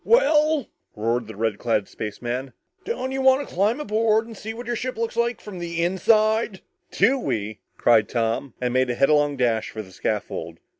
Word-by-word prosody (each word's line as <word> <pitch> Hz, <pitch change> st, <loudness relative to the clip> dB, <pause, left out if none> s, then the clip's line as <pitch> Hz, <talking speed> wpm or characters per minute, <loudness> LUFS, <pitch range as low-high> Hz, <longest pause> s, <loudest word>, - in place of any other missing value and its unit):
"Well," 315 Hz, -, +3 dB, 0.3 s
roared 115 Hz, +1 st, -1 dB
the 110 Hz, -, -9 dB
red 110 Hz, -1 st, -1 dB
clad 110 Hz, -4 st, 0 dB
spaceman, 120 Hz, +5 st, -5 dB, 0.3 s
"don't 265 Hz, -, -3 dB
you 270 Hz, 0 st, -2 dB
want 265 Hz, +2 st, +4 dB
to -, -, -13 dB
climb 210 Hz, +8 st, +2 dB
aboard 220 Hz, -3 st, +2 dB
and 230 Hz, -1 st, -10 dB
see 220 Hz, +2 st, -6 dB
what 235 Hz, +2 st, -8 dB
your 240 Hz, +1 st, -2 dB
ship 255 Hz, +1 st, -4 dB
looks 230 Hz, 0 st, -2 dB
like 235 Hz, +1 st, -1 dB
inside?" 190 Hz, +4 st, +1 dB, 0.3 s
"Do 270 Hz, +2 st, +3 dB
we!" 110 Hz, -, -3 dB, 0.2 s
cried 110 Hz, -3 st, +4 dB
Tom, 115 Hz, +2 st, -1 dB
and 125 Hz, -1 st, -1 dB
made 130 Hz, 0 st, +2 dB
a 120 Hz, -, 0 dB
headlong 145 Hz, +1 st, +3 dB
dash 115 Hz, -3 st, +1 dB
for 110 Hz, -, -6 dB
the 95 Hz, -, -15 dB
scaffold. -, -, -3 dB
175 Hz, 180 wpm, -24 LUFS, -, 0.3 s, want